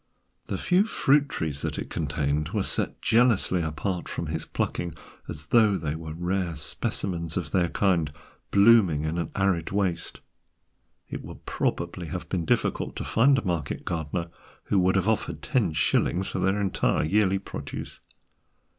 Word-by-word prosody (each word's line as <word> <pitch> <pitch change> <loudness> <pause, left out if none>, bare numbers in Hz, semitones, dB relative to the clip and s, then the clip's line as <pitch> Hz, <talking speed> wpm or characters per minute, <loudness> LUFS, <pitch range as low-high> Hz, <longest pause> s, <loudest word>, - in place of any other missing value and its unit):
The - - -2
few 185 +3 +3
fruit 145 -8 +3
trees 75 - -3
that - - -3
it - - -5
contained 75 +2 -1
were 105 -3 +1
set - - -2
jealously 110 -6 +3
apart 85 +4 -3
from - - -3
his 80 0 -3
plucking, 85 -2 -2 0.4
as 75 0 -6
though 110 -4 +5
they 75 -4 -2
were 80 -1 -6
rare 90 0 -1
specimens 85 +1 -2
of 90 -4 -3
their 90 -3 +2
kind 85 -7 +1 0.4
blooming 100 -7 +5
in 80 +2 -1
an 85 - -2
arid 95 -4 +1
waste; 95 -4 -1 0.9
it - - -5
would - - -11
probably 85 0 -2
have 90 +3 -5
been 90 -3 -1
difficult - - 0
to - - -4
find 135 +5 +4
a 120 - -2
market 85 -6 -2
gardener 85 0 -3 0.3
who 100 - +2
would 95 +1 +3
have 95 0 +2
offered 110 -1 -1
ten 120 - +1
shillings 85 +4 +1
for - - -3
their 95 +2 +1
entire 100 -2 +1
yearly 95 +4 +3
produce. 95 - -7
90 Hz, 160 wpm, -26 LUFS, 80-100 Hz, 0.9 s, though